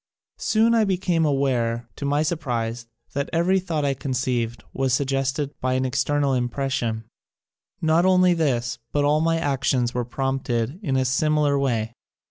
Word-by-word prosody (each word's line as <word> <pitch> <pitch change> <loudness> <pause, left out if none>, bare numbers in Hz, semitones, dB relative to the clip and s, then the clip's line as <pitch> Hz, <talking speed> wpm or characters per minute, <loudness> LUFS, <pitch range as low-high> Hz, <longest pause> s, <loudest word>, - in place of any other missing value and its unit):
Soon 225 +1 +3
I 225 -1 +4
became 180 -4 +1
aware, 120 -5 0
to - - -4
my 145 +2 +2
sur 160 +2 0
prise, 120 -5 -3 0.3
that 140 0 -2
every 180 +3 +2
thought 165 -5 -2
I 140 - +2
conceived 125 -3 -2
was 130 -2 +1
suggested 135 +1 -1
by 130 0 0
an 130 0 0
external 135 +2 +1
impression. 120 -3 -1 0.8
Not 160 +2 +4
only 185 -1 +5
this 120 -7 0
but 145 -1 +1
all 150 +1 +3
my 165 0 +2
actions 135 -5 0
were 125 - -1
prompted 130 +2 -2
in 135 -10 0
a 130 - +1
similar 145 +2 +2
way. 115 -4 -1
135 Hz, 155 wpm, -23 LUFS, 125-155 Hz, 0.8 s, only